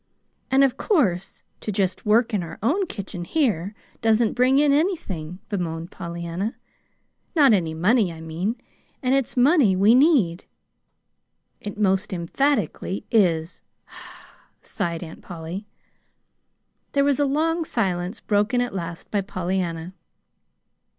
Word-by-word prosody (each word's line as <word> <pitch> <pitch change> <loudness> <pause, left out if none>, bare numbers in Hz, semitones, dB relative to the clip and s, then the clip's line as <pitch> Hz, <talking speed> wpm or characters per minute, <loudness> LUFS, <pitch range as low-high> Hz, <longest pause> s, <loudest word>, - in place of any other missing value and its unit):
"And 270 +1 +5
of 265 -1 +2
course, 195 - 0 0.2
to 215 - -4
just 190 0 -1
work 230 +2 +3
in 205 - +1
our 170 - -7
own 355 - +1
kitchen 190 - -6
here 205 - 0 0.3
doesn't 225 0 +3
bring 255 +2 +3
in 290 0 +4
anything," 200 - -1
bemoaned 170 -3 -4
Pollyanna, 170 +4 -4 0.4
" - - -47
not 280 -7 +6
any 165 -5 0
money, 200 +3 +3
I 165 - -10
mean. 165 +7 -3 0.5
And 255 +1 +2
it's 270 -2 0
money 255 - +5
we 200 +4 +5
need." 250 - +3 1.1
"It 205 0 -7
most 195 -2 +1
emphatically 205 +1 -1
is," 170 -6 +2 1.0
sighed 170 -4 -3
Aunt 160 -1 -10
Polly. 175 +4 -7 1.3
There 280 - +3
was 280 -1 +2
a 290 - +3
long 325 +4 +1
silence, 185 - -2
broken 210 +3 +1
at 245 0 -1
last 170 -3 -6
by 205 - +1
Pollyanna. 180 -2 -3
205 Hz, 130 wpm, -23 LUFS, 175-255 Hz, 1.3 s, not